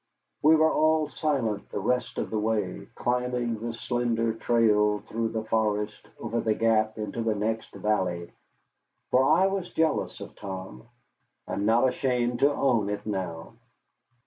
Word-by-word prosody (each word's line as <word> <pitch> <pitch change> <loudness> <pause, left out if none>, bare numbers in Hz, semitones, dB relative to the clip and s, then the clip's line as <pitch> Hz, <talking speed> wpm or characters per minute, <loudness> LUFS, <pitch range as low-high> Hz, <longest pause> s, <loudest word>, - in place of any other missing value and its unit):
We 155 +2 +6
were 160 0 +4
all 155 -1 +3
silent 130 -11 -1
the - - -3
rest 125 +4 -1
of - - -3
the 110 - 0
way, 110 0 -1
climbing 125 -2 -1
the 115 +1 -3
slender 115 -1 -1
trail 105 -2 +3
through 115 +1 -2
the 110 -1 -3
forest 105 -1 -1
over 115 0 -2
the 110 -1 +1
gap 110 -1 +2
into 110 +2 -4
the 110 -1 0
next 110 +2 -2
valley. 90 -5 -1 0.8
For 130 - +5
I 190 - +5
was 195 -2 -1
jealous 160 -2 0
of - - -9
Tom. 95 -10 -8 0.6
I - - -4
am 100 - -1
not 120 +4 +4
ashamed 125 -2 0
to 140 - +4
own 120 -8 +1
it 105 0 -4
now. 95 -6 -4
115 Hz, 155 wpm, -27 LUFS, 105-125 Hz, 0.8 s, We